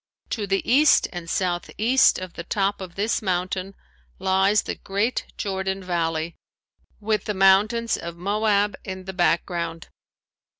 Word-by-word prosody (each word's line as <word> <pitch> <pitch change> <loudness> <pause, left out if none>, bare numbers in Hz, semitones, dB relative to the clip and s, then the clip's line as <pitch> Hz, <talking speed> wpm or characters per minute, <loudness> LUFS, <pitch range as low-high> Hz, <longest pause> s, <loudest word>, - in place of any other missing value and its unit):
To 210 -4 -2
the 195 0 -1
east 290 +5 +5
and 175 -1 -6
southeast 195 +8 +2
of 185 -2 -7
the 170 - -7
top 200 +2 -1
of 180 -2 -8
this 210 +3 0
mountain 185 0 -2 0.4
lies 190 +2 +2
the - - -3
great 205 +5 -2
Jordan 190 -1 -2
valley 165 -2 -1 0.7
with 215 0 -1
the 210 - -2
mountains 210 +5 +3
of 170 0 -7
Moab 205 +1 +1
in 185 -1 -7
the 190 - -6
background. 170 -2 -1
190 Hz, 135 wpm, -24 LUFS, 175-210 Hz, 0.7 s, east